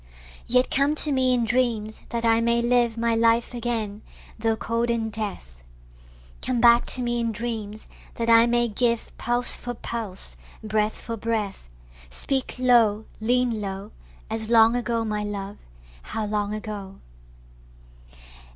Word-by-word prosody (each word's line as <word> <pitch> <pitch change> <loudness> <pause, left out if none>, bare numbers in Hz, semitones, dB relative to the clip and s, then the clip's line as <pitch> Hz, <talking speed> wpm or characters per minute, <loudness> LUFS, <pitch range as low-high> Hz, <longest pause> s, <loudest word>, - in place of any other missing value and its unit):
Yet 250 +1 +2
come 280 +2 +2
to 300 -1 +4
me 260 -2 +2
in 245 -2 +2
dreams, 225 -2 0
that 235 0 -2
I 225 0 +4
may 235 0 +2
live 240 -1 +2
My 230 0 +1
life 230 +1 +2
again 225 -4 -3 0.4
tho' 225 0 +1
cold 230 +1 -1
in 225 -1 -1
death: 200 - -6 0.8
Come 255 -2 -1
back 235 0 +5
to 250 - +4
me 240 0 -1
in 230 -1 0
dreams, 220 -2 -5 0.3
that 230 - -2
I 230 0 +6
may 240 0 +2
give 235 +1 -1
Pulse 240 +1 +1
for 245 0 -6
pulse, 225 -5 -6 0.3
breath 215 0 0
for 230 -1 -5
breath: 210 - -3 0.4
Speak 265 - -1
low, 230 -4 +3
lean 240 0 +1
low, 195 +1 -5 0.4
As 220 0 -4
long 230 0 +6
ago, 235 -2 -1
my 210 -1 -2
love, 205 -1 -5 0.4
how 220 - -4
long 205 -1 -1
ago. 210 -2 -6
230 Hz, 145 wpm, -24 LUFS, 215-240 Hz, 0.8 s, I